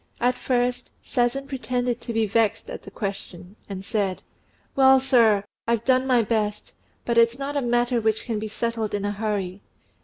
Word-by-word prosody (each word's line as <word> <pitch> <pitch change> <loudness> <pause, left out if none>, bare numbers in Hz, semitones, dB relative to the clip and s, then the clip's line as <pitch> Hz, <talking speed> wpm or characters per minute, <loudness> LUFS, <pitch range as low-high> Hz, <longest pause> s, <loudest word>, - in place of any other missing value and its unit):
At 245 +1 +3
first 250 0 -1
Sazen 250 +3 0
pretended 250 -3 -2
to 235 - -5
be 225 -1 +1
vexed 215 0 0
at - - -6
the - - -11
question, 195 -2 -6
and 195 -1 -6
said, 200 -3 -1 0.5
"Well, 265 -1 +6
sir, 235 -6 +4 0.2
I've 235 -1 0
done 255 0 +3
my 245 -3 +4
best; 210 -1 -2 0.3
but 235 -1 +3
it's 230 +1 +4
not 280 +1 -4
a 285 - +1
matter 240 0 +1
which 220 0 0
can 225 -3 -2
be 215 - -4
settled 220 0 -2
in 205 0 -2
a 205 - 0
hurry. 200 -3 -3
230 Hz, 180 wpm, -24 LUFS, 210-250 Hz, 0.5 s, Well